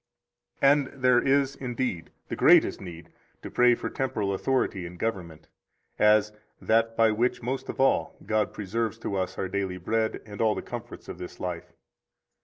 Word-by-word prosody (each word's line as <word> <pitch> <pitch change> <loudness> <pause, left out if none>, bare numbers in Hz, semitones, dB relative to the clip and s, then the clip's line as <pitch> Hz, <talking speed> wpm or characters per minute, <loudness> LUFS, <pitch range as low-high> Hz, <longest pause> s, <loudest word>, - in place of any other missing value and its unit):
74 140 - +7 0.2
And 130 - -14
there 125 -1 +6
is, 140 0 +2
indeed, 125 -9 -3 0.2
the - - -3
greatest - - +5
need 85 -3 -10 0.3
to - - -7
pray 125 0 +5
for - - -5
temporal 105 -7 -2
authority 100 -5 -1
and 90 +1 -11
government, 85 -7 -4 0.5
as 105 0 +4 0.3
that 115 +1 +1
by 115 -1 +5
which 120 +3 0
most 130 +3 -3
of - - -6
all 135 - +2
God 110 -2 0
preserves 110 +2 -3
to 105 -3 -4
us 95 -1 -2
our 95 - -2
daily 95 -1 -3
bread 110 +5 -1
and 105 -1 -7
all 110 -1 +3
the - - -5
comforts - - -8
of - - -8
this 90 - -8
life. 90 -2 -5
110 Hz, 175 wpm, -27 LUFS, 95-125 Hz, 0.5 s, 74